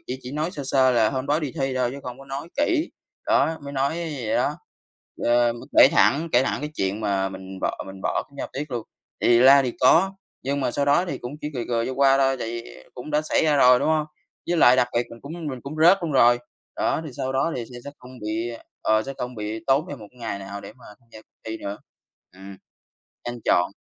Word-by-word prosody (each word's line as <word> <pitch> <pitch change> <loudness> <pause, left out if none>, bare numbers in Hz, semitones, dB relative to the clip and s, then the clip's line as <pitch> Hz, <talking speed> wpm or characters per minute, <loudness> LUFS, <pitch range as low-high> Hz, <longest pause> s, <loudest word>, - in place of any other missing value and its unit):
chỉ 130 - -4
chỉ 125 - -8
nói 155 +4 -2
sơ 145 - -6
sơ 130 -1 +4
là 115 -3 +3
hôm 130 0 -3
đó 150 +2 +1
đi 150 -4 -4
thi 135 -1 0
thôi 125 -1 +1
chứ 140 - -7
không 125 0 -7
có 135 - -12
nói 140 +4 -6
kỹ, 315 +3 +1 0.4
đó 160 0 +2
mới 140 - -7
nói 140 +2 0
vậy 150 -9 -3
đó. - - +1 0.7
Ờ, 120 0 +3 0.3
kể - - +10
thẳng 140 +12 +3
kể 120 - +5
thẳng - - -2
cái 150 +1 -4
chuyện 95 -1 -2
mà 100 -2 0
mình 95 0 -9
bỏ - - -2
mình 95 0 -10
bỏ - - 0
kiểm 140 - -18
tra - - -2
1 - - -9
tiết 145 +2 -5
luôn. 120 -2 -2 0.4
Thì 120 - +5
la 135 +2 +8
thì 125 -2 -2
có, 170 +9 +5 0.3
nhưng 140 +2 -1
mà 130 - 0
sau 140 +3 0
đó 145 +5 +3
thì 140 -7 -4
cũng 120 +2 -7
chỉ 150 - -2
cười 120 -2 -3
cười 115 -1 0
cho 130 - -3
qua 135 0 +4
thôi, 135 -1 +2
tại 115 - -4
vì 115 0 -8
cũng 125 +4 -8
đã 150 0 +1
xảy 155 - +1
ra 150 -2 +3
rồi, 125 -2 +6
đúng - - 0
không? 155 -1 +1 0.4
Với 175 - +1
lại 125 -4 +7
đặc 125 -1 +3
biệt 120 - +1
mình 115 - -11
cũng 140 - -8 0.2
mình 130 -2 -7
cũng 145 +3 -7
rớt 180 +4 +7
luôn 165 -3 -2
rồi. 120 -2 +5 0.4
Đó, - - 0
thì - - -7
sau 130 - -2
đó 135 +5 0
thì 120 - -4
sẽ - - -8
sẽ 145 - -6
không 125 - -13
bị, 110 +2 -3 0.3
ờ, 110 0 +3
sẽ 135 - -6
không 125 0 -4
bị 110 0 -5
tốn 140 +4 +2
thêm 145 - -6
một 105 - -11
cái 125 - -23
ngày 115 -4 -4
nào 100 +1 -7
để 100 - -10
mà 125 +2 -20 0.2
tham 120 - -31
gia - - -10
cuộc - - -50
thi 110 0 -4
nữa. 100 +1 -5 0.6
Ừm, 95 +1 -11 0.7
nên 120 0 -5
chọn 90 +2 +3
130 Hz, 260 wpm, -24 LUFS, 115-140 Hz, 0.7 s, kể